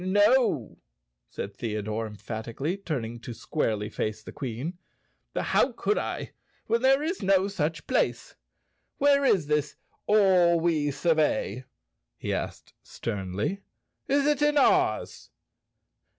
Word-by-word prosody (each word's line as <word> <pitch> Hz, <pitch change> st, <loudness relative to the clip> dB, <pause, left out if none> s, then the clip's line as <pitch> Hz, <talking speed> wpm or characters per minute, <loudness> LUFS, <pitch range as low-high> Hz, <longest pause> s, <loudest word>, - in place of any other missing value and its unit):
"No!" 205 Hz, +7 st, +3 dB, 0.5 s
said 100 Hz, -, -6 dB
Theodore 110 Hz, 0 st, -3 dB
emphatically, 115 Hz, -, -4 dB
turning 125 Hz, -, -4 dB
to 120 Hz, 0 st, -8 dB
squarely 110 Hz, -9 st, -1 dB
face 110 Hz, 0 st, -3 dB
the -, -, -9 dB
Queen. 135 Hz, +7 st, -5 dB, 0.6 s
"How -, -, +2 dB
could 425 Hz, -, 0 dB
I, -, -, -4 dB, 0.3 s
when 230 Hz, 0 st, +1 dB
there 270 Hz, +2 st, +4 dB
is 340 Hz, +4 st, -2 dB
no 195 Hz, 0 st, +3 dB
such 165 Hz, -5 st, -2 dB
place. 255 Hz, -, 0 dB, 0.6 s
Where 280 Hz, 0 st, +4 dB
is 190 Hz, -, +3 dB
this 150 Hz, -1 st, 0 dB, 0.3 s
All 185 Hz, -5 st, +5 dB
we 160 Hz, -3 st, +1 dB
survey?" 150 Hz, -4 st, 0 dB, 0.5 s
he -, -, -3 dB
asked -, -, -5 dB
sternly. 100 Hz, -, -3 dB, 0.5 s
"Is 280 Hz, 0 st, +2 dB
it 295 Hz, -1 st, +2 dB
in 295 Hz, 0 st, +3 dB
Oz?" 280 Hz, -, +2 dB
160 Hz, 120 wpm, -27 LUFS, -, 0.6 s, All